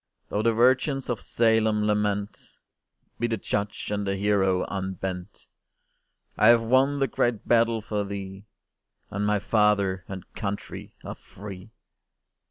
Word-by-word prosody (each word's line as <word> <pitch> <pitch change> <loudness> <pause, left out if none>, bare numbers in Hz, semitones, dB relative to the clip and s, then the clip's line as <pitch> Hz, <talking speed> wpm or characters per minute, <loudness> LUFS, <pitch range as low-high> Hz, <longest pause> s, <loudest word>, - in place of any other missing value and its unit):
Though 105 - 0
the 115 +1 +3
virgins 130 +3 +2
of 115 - -3
Salem 110 -2 +2
lament, 105 -1 -2 0.6
Be 120 - +1
the 115 -1 -1
judge 100 +1 -3
and 100 -1 -2
the 95 - 0
hero 95 -2 +2
unbent! 95 -1 -5 0.9
I 110 - +5
have 115 -1 +6
won 130 +4 +3
the 135 - +2
great 120 -3 -1
battle 115 -2 +3
for 105 -2 -2
thee, 100 0 -7 0.6
And 100 +1 -1
my 105 0 +2
Father 100 -3 +2
and 95 -2 -7
Country 100 -1 -6
are - - -5
free! 100 +1 -11
105 Hz, 135 wpm, -26 LUFS, 100-115 Hz, 0.9 s, have